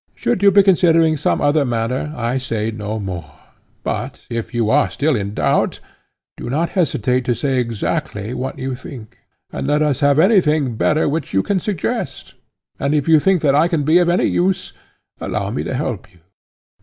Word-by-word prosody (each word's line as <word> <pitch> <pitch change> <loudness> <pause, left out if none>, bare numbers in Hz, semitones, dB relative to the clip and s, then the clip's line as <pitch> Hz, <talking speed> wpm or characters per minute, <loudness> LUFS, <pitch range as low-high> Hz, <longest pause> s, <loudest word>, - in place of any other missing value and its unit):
Should 240 -5 -1
you 200 - +7
be 200 +1 +5
considering 165 -4 +4
some 150 - 0
other 145 +1 +3
matter 125 +4 -2
I 120 +2 -1
say 115 -3 -2
no 110 0 -4
more, 90 -6 -6 0.5
but - - -4
if 115 -1 -4
you 115 -3 0
are 145 +1 +3
still 150 0 0
in 100 -1 -3
doubt - - +1 0.6
do - - -6
not 160 +6 0
hesitate 130 - 0
to 120 - +1
say 135 -1 0
exactly 115 -1 -3
what 130 +1 -4
you 130 0 -3
think, 125 -3 -10 0.3
and - - -4
let 150 +1 +2
us 145 -3 0
have 140 -1 +3
anything 155 - +3
better 155 +7 +1
which 145 -6 -3
you 95 - +3
can 200 -2 0
suggest; 190 -3 -4 0.5
and 140 +2 0
if 145 0 0
you 160 -1 +6
think 185 +1 +2
that 140 -2 +3
I 150 +4 +4
can 165 -4 0
be 160 +5 +4
of 175 -1 +2
any 175 - +2
use, 185 +1 0 0.5
allow 100 -1 -3
me 125 - -2
to - - -3
help 115 -7 -4
you. 90 -3 -25
140 Hz, 190 wpm, -19 LUFS, 115-160 Hz, 0.6 s, you